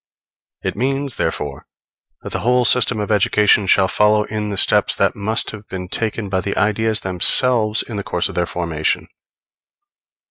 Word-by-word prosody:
It - - -3
means, 135 +3 -2
therefore, 75 -3 -4 0.6
that - - -7
the - - -2
whole 125 +1 +1
system 125 -2 +3
of 105 0 -3
education 105 0 +3
shall 95 +1 +4
follow 105 +2 +2
in 105 0 -4
the 100 - -4
steps - - +3
that - - +1
must 105 +2 +1
have 110 -1 -11
been 90 -1 -7
taken 110 0 -3
by 95 -1 -1
the 100 +2 -4
ideas 110 +1 0
themselves 110 +4 +2
in 110 - -7
the 100 - -4
course 90 -2 -1
of - - -8
their 85 -1 -1
formation. 85 -3 -2
105 Hz, 170 wpm, -18 LUFS, 95-110 Hz, 0.6 s, shall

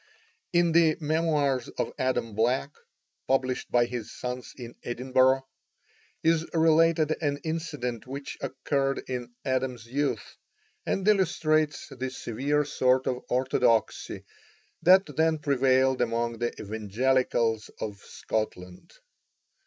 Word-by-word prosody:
In 175 -1 +3
the 160 -1 +4
"Memoirs 150 -5 +1
of - - -2
Adam 120 -4 0
Black," 125 +6 +1 0.6
published 130 -1 0
by 120 -1 +4
his 120 -2 -6
sons 125 0 -5
in 120 -2 -8
Edinburgh, 130 +2 +2 0.8
is 165 0 +3
related 160 -1 +4
an 145 -2 0
incident 150 -8 -4
which 140 +2 -6
occurred 135 +1 -1
in 125 -1 -4
Adam's 130 -3 -1
youth, 130 -3 -2 0.5
and 195 +1 -1
illustrates 160 -6 +2
the 130 -1 -4
severe 140 +4 -1
sort 130 -2 +2
of 125 -1 -2
orthodoxy 125 -3 +1 0.6
that 190 +2 +6
then 160 0 +3
prevailed 130 -2 +2
among 115 -1 -1
the 120 0 0
Evangelicals 110 +1 0
of 105 -2 -4
Scotland. 90 -5 -5
130 Hz, 110 wpm, -27 LUFS, 120-150 Hz, 0.8 s, that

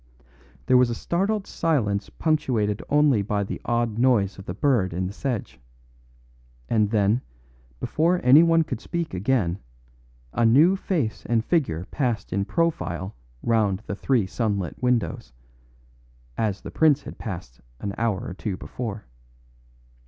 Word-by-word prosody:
There 130 - +5
was 125 -1 +4
a 120 - -2
startled 195 - -1
silence 110 -12 0
punctuated 125 -10 0
only 145 -6 +4
by 100 0 -1
the 100 - -6
odd 120 -2 0
noise 110 -7 +2
of 95 - -11
the 90 - -3
bird 110 -8 +1
in 90 +2 -1
the 95 - -5
sedge; 110 - -4 1.1
and 105 -3 +2
then, 105 +2 +2 0.6
before 170 +3 +1
anyone 165 +5 +6
could - - -5
speak 170 - -3
again, 95 -2 0 0.7
a 120 - +1
new 145 +12 +6
face 160 - -2
and 115 -1 +1
figure 110 - 0
passed 125 -6 -1
in 100 +1 0
profile 110 - -1 0.3
round 110 -4 +1
the - - -4
three 120 -1 +1
sunlit 100 -3 -2
windows, 120 - -1 1.0
as 105 +1 -1
the - - -8
prince 150 -3 +3
had - - -10
passed 85 - -7 0.2
an 100 -1 -4
hour 110 -4 0
or - - -5
two 95 0 -4
before. 110 -1 -6
115 Hz, 140 wpm, -24 LUFS, 100-140 Hz, 1.1 s, anyone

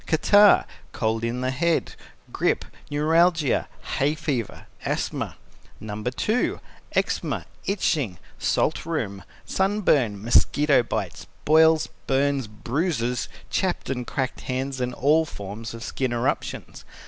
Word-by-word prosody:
Catarrh, 205 +5 +6 0.3
cold 110 0 -1
in 120 +2 -1
the 130 0 0
head, 170 +6 0 0.4
grip, - - +1 0.2
neuralgia, 160 0 +2 0.3
hay 145 +3 +2
fever, 145 -8 -3 0.2
asthma. - - -2 0.4
No. 105 0 -6
2. 170 - 0 0.3
Eczema, - - -1 0.2
itching, 150 - 0 0.2
salt 155 - +1
rheum, 115 -12 -3 0.2
sunburn, 180 - +1
mosquito 140 +6 +4
bites, 105 -6 -4 0.2
boils, 160 +1 +5 0.2
burns, 135 -2 +1
bruises, 120 - -2 0.2
chapped 185 -6 -1
and 125 -2 -3
cracked 130 -3 -2
hands, 130 +1 -3
and 125 0 -2
all 155 +4 +4
forms 110 -4 -7
of 115 - -8
skin 130 0 -2
eruptions. 120 - -2
135 Hz, 110 wpm, -25 LUFS, 115-160 Hz, 0.4 s, Catarrh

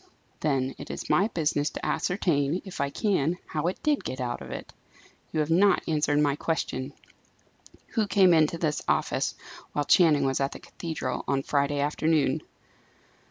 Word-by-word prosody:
Then 135 -3 0
it - - -8
is - - -4
my 195 - +4
business 155 -7 0
to - - -6
ascertain, 170 -3 0
if 190 -7 -5
I 140 - 0
can, 175 -2 0
how 155 +2 -2
it 185 - -3
did 300 -2 +1
get 130 - -5
out 120 -1 -3
of - - -8
it. - - -7 0.6
You 155 - +1
have 150 +1 -2
not 195 +4 +4
answered 150 -2 +1
my 145 -1 +3
question. 145 -4 -2 1.0
Who 220 -3 0
came 190 -3 +5
into 160 0 +3
this 155 -3 -1
office, - - 0 0.4
while 145 - 0
Channing 150 -3 +5
was 135 -1 0
at 135 0 0
the - - -9
cathedral, 160 -7 -4
on 135 0 0
Friday 140 0 0
afternoon?" 150 +1 +1
150 Hz, 165 wpm, -27 LUFS, 140-170 Hz, 1.0 s, came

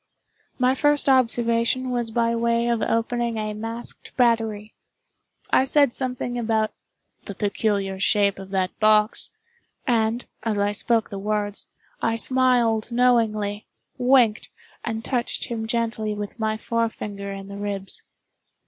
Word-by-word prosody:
My 255 0 +3
first 290 +2 +2
observation 240 -1 +2
was 240 -2 -1
by 230 +1 +1
way 235 0 +1
of 235 -1 +1
opening 235 0 0
a 215 -1 -2
masked 225 +2 -6
battery. 225 -3 +1 0.8
I - - +5
said 280 -1 +3
something 250 -2 -2
about 220 -2 0 0.5
the 200 - -7
"peculiar 200 -1 -1
shape 200 0 +2
of 195 0 -9
that 190 -1 -1
box"; 215 0 +4 0.6
and, 230 -1 +1 0.2
as 215 -1 -1
I 205 0 +1
spoke 225 +2 +1
the 200 - -5
words, 205 0 -1 0.3
I 225 - +1
smiled 240 -2 +3
knowingly, 220 -4 +1 0.3
winked, 245 -4 +3 0.3
and 225 -1 -4
touched 245 -3 -1
him 225 -2 -3
gently 225 -2 -1
with 205 +2 -6
my 220 0 0
forefinger 210 -3 -3
in 195 0 -7
the 200 0 -8
ribs. 200 -1 -4
225 Hz, 130 wpm, -24 LUFS, 210-240 Hz, 0.8 s, I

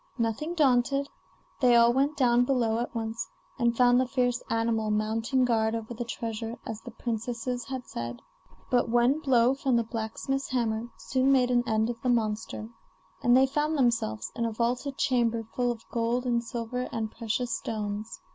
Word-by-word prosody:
Nothing 235 +9 -1
daunted, 275 -1 +2 0.5
they 245 -3 +5
all 235 0 +6
went 280 +3 +1
down 245 -2 +4
below 240 -4 +1
at 240 +1 -4
once, 225 0 -3 0.3
and 235 -1 +2
found 245 0 +5
the 260 - 0
fierce 245 -2 0
animal 225 -1 0
mounting 225 +4 +1
guard 225 -2 +1
over 225 +1 -5
the 240 +1 -4
treasure 230 0 -5
as 220 0 -5
the - - -9
princesses 235 +1 -3
had 260 -2 -5
said. 120 0 -6 0.5
But 245 -2 +3
one 240 +5 +3
blow 255 -4 +4
from 270 -2 0
the 235 - +3
blacksmith's 230 +5 -3
hammer 235 -2 -1
soon 265 0 +1
made 250 -2 +4
an 240 -1 +3
end 220 +1 +1
of 230 -1 -10
the 250 - 0
monster, 220 -1 -1 0.5
and 245 +1 +5
they 265 - +6
found 295 +3 0
themselves 230 - 0
in 235 - -1
a 230 - 0
vaulted 245 +5 -1
chamber 235 -3 +1
full 245 -1 +1
of 230 -1 -8
gold 235 +2 0
and 235 -1 +1
silver 240 +2 -4
and 220 -1 -3
precious 230 +1 -2
stones. 210 0 -4
240 Hz, 175 wpm, -28 LUFS, 225-250 Hz, 0.5 s, all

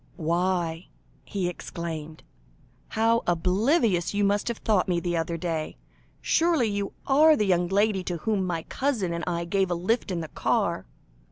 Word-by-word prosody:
"Why," 170 0 -1 0.4
he 190 -3 -2
exclaimed, 160 -3 -6 0.6
"how 230 +1 +2
oblivious 185 - +2
you 205 - +2
must 205 +1 +1
have 235 -2 -2
thought 210 -4 +1
me 175 -2 +1
the 175 0 -2
other 165 0 -1
day! 165 -2 -3 0.4
Surely 330 -6 +2
you 200 -1 -2
are 305 +3 +6
the 210 - +1
young 175 -2 +2
lady 200 0 +1
to 175 - -2
whom 200 +3 0
my 170 -3 -2
cousin 235 -11 -1
and 170 - -3
I 170 -1 -1
gave 190 +2 +1
a 175 - 0
lift 205 +8 0
in 175 -3 -2
the 160 - -6
car?" - - 0
185 Hz, 165 wpm, -26 LUFS, 170-215 Hz, 0.6 s, are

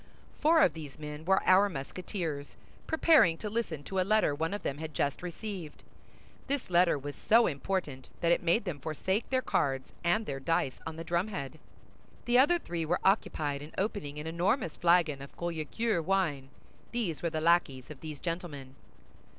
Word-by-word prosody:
Four 320 +1 +5
of 165 - +4
these 150 -3 -9
men 150 +1 -7
were 190 +1 +3
our 195 +2 +6
Musketeers, 160 -1 -5 0.3
preparing 315 - +5
to 210 +2 -5
listen 185 -10 -2
to 190 +5 -3
a - - +4
letter 210 -4 +3
one 160 +4 -2
of 205 -1 -4
them 140 - -3
had 155 -1 -6
just 140 -1 0
received. 180 -2 -7 0.6
This 275 -8 -2
letter 175 -2 +4
was 145 +1 -6
so 230 +2 +4
important 140 -3 -3
that 170 - +2
it - - +3
made 175 +6 +2
them 170 -6 -4
forsake 190 - -2
their 260 -1 +1
cards 135 -2 0
and 175 +6 +2
their 135 -6 -4
dice 135 -2 0
on 160 - -5
the 165 - -6
drumhead. 170 -5 -2 0.7
The 240 +1 +4
other 295 +7 +5
three 170 - -4
were 165 +3 0
occupied 150 -7 +1
in 150 +2 -10
opening 190 -8 -2
an 150 - -5
enormous 175 - 0
flagon 170 -5 +3
of 140 - -11
Collicure 170 +5 -1
wine; 155 -8 0 0.4
these 200 - -2
were 170 - 0
the 155 - -2
lackeys 155 -5 +2
of 145 - -10
these 155 -2 -6
gentlemen. 155 -6 -5
170 Hz, 175 wpm, -30 LUFS, 150-195 Hz, 0.7 s, our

